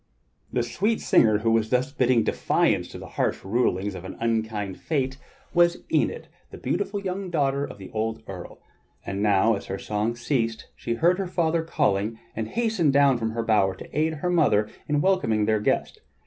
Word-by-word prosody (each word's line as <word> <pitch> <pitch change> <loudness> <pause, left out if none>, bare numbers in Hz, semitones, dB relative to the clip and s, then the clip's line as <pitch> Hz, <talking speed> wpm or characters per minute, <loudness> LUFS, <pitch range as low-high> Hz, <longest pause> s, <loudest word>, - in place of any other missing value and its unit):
The 120 - +1
sweet 210 - 0
singer 110 -2 +4
who 115 +2 +1
was 110 -1 +2
thus 125 +2 +1
bidding 125 -4 +3
defiance - - +1
to - - -9
the - - -9
harsh - - 0
rulings 100 -2 0
of 90 - -8
an 95 - -8
unkind 110 -4 -2
fate 135 -3 -2 0.3
was 175 0 +3
Enid, - - +1 0.2
the - - -10
beautiful 220 - -2
young 190 -1 -4
daughter 140 -4 +1
of 145 - -6
the 95 -2 -10
old 110 0 -2
earl; 90 -2 -8 0.5
and 100 +1 -3
now 105 +2 +4
as 100 - -5
her 95 - -3
song 105 +3 -2
ceased 120 -3 -1
she 115 - -3
heard 175 +9 +3
her 195 - -1
father 170 -2 +1
calling, 110 -9 0 0.2
and 110 0 -3
hastened 220 - +1
down 140 -3 +4
from 110 -1 -1
her 115 0 -2
bower 100 -4 +2
to - - -12
aid 160 +2 +1
her 180 +4 -2
mother 105 -11 +3 0.2
in 150 -1 +1
welcoming 115 - +2
their 110 0 +2
guest. 105 - -1
115 Hz, 190 wpm, -25 LUFS, 105-160 Hz, 0.5 s, singer